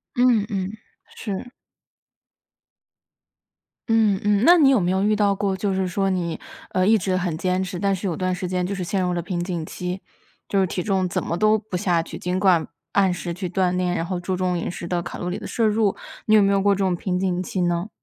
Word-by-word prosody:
嗯 245 -4 +4
嗯， 195 -1 -2 0.4
是。 210 +3 -5 2.4
嗯， 215 -4 +3
嗯， 205 0 +2
那 350 - +8
你 280 - +6
有 265 -4 +4
没 180 -1 +1
有 190 +1 +1
遇 210 +1 +3
到 205 -1 +3
过， 195 -1 -1
就 195 0 -1
是 190 -1 0
说 195 +1 0
你， 170 -3 -2 0.3
呃， 185 +1 +2
一 220 - +6
直 185 -2 0
很 180 -3 -1
坚 185 +1 0
持， 180 -1 -5
但 200 +1 +1
是 185 - -6
有 175 -4 -1
段 185 +2 -1
时 180 0 -3
间 180 0 -1
就 200 +2 -3
是 185 - -3
陷 190 +2 -1
入 180 -1 0
了 175 - -1
瓶 175 0 -3
颈 175 -3 -3
期， 180 +3 -5 0.5
就 195 -1 +2
是 190 - +2
体 180 0 -3
重 190 -3 0
怎 - - -2
么 170 - -2
都 215 +4 +3
不 210 -2 -7
下 175 -3 +1
去， - - -9
尽 180 +1 -1
管 185 -4 +3 0.2
按 195 -2 +3
时 175 -1 -4
去 180 0 -4
锻 180 -1 +1
炼， 180 -1 0
然 165 - -1
后 180 0 -3
注 185 +1 -2
重 185 -1 0
饮 - - -3
食 170 -1 -6
的 175 -1 -1
卡 175 - -7
路 175 - -3
里 180 - -3
的 - - -7
摄 230 - 0
入， 215 -2 +2 0.3
你 215 - +5
有 210 - +7
没 200 - +3
有 195 0 +2
过 200 0 +3
这 - - -7
种 185 -2 +1
瓶 180 +1 -2
颈 180 -1 0
期 185 0 -3
呢？ 175 +3 0
185 Hz, 260 characters per minute, -23 LUFS, 180-200 Hz, 2.4 s, 那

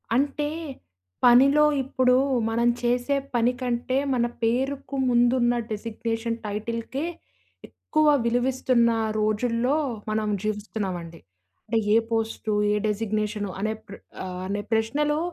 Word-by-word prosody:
అంటే 290 +3 0 0.8
పనిలో 270 +5 +6 0.2
ఇప్పుడు, 255 -1 +2 0.3
మనం 235 +1 +1
చేసే 245 +3 +1 0.2
పని 240 +1 +3
కంటే 245 +1 -1 0.2
మన 240 -2 +2 0.2
పేరుకు 265 +4 -1
ముందు 240 0 +4
ఉన్న 240 0 +3 0.2
డెజిగ్నేషన్ 225 +1 -3
టైటిల్‌కే 230 +6 -3 0.6
ఎక్కువ 310 -1 0 0.2
విలువిస్తున్న 245 0 +2 0.3
రోజుల్లో 230 +5 +1 0.4
మనం 215 0 0
జీవిస్తున్నామండి. 200 -6 -4 0.5
అంటే 225 +1 +1 0.2
ఏ - - +7
పోస్టు, 225 -1 -1 0.2
ఏ - - +2
డెజిగ్నేషను 210 -1 -2
అనే 215 +2 -1
ప్ర 200 - -9 0.3
ఆహ్, 180 -1 -5
అనే 205 +1 -2
ప్రశ్నలో 290 +7 +1
235 Hz, 110 wpm, -25 LUFS, 215-255 Hz, 0.8 s, ఏ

